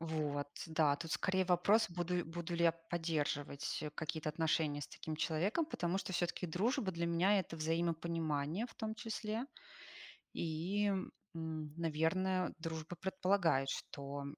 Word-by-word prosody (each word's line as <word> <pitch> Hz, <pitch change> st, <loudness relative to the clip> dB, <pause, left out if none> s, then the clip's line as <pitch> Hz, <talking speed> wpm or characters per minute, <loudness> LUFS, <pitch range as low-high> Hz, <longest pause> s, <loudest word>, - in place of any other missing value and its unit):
Вот, 150 Hz, -3 st, -1 dB, 0.2 s
да, 155 Hz, -3 st, +3 dB
тут 165 Hz, +1 st, -5 dB
скорее 190 Hz, 0 st, +2 dB
вопрос, 190 Hz, +5 st, +4 dB
буду 175 Hz, 0 st, -1 dB
буду 170 Hz, +1 st, -4 dB
ли 170 Hz, -, +3 dB
я 165 Hz, -, +6 dB, 0.2 s
поддерживать, 150 Hz, -4 st, -1 dB
э, 150 Hz, -, -3 dB
какие-то 155 Hz, 0 st, -3 dB
отношения 155 Hz, -1 st, +1 dB
с -, -, -6 dB
таким 155 Hz, -, -5 dB
человеком, 190 Hz, -, +1 dB
потому 180 Hz, -, 0 dB
что 190 Hz, -, -4 dB
всё-таки 175 Hz, 0 st, 0 dB
дружба 215 Hz, -, +1 dB
для 170 Hz, 0 st, -1 dB
меня- 180 Hz, +5 st, +4 dB
это 165 Hz, -3 st, -3 dB
взаимопонимание 165 Hz, +2 st, 0 dB
в -, -, -16 dB
том 220 Hz, -1 st, -3 dB
числе. 220 Hz, +1 st, -2 dB, 0.9 s
И, 170 Hz, +6 st, 0 dB
м, 195 Hz, -2 st, 0 dB, 0.7 s
наверное, 170 Hz, +4 st, +1 dB
дружба 160 Hz, +1 st, -4 dB
предполагает, 185 Hz, -6 st, +2 dB
что 140 Hz, 0 st, -4 dB
170 Hz, 140 wpm, -37 LUFS, 155-185 Hz, 0.9 s, я